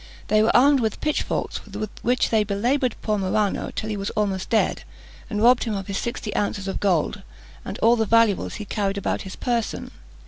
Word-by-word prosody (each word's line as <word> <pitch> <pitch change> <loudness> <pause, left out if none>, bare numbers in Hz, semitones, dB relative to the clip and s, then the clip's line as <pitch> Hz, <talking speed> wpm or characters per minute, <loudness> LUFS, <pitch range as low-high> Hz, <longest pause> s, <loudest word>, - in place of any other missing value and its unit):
They 215 0 +4
were 220 - +3
armed 280 +2 +5
with 220 -3 -1
pitchforks, 300 -1 -2
with 215 -1 -6
which 250 +2 +1
they 220 -2 +4
belaboured 240 +5 0
poor 215 -2 0
Marano 200 +1 0
till 215 - -3
he 215 -1 -3
was 195 0 -3
almost 195 -3 -1
dead, 225 - +1 0.5
and 210 -1 -1
robbed 245 +1 +5
him 220 -3 -2
of 195 -1 -4
his 195 0 -3
sixty 235 -3 -4
ounces 200 -1 -1
of 195 - -3
gold 195 +1 +1 0.4
and 200 - -6
all 230 +2 +6
the 220 -2 0
valuables 230 -3 +3
he 210 - -6
carried 200 -1 -1
about 200 - -1
his 190 -1 -8
person. 235 -3 -2
215 Hz, 200 wpm, -23 LUFS, 200-230 Hz, 0.5 s, all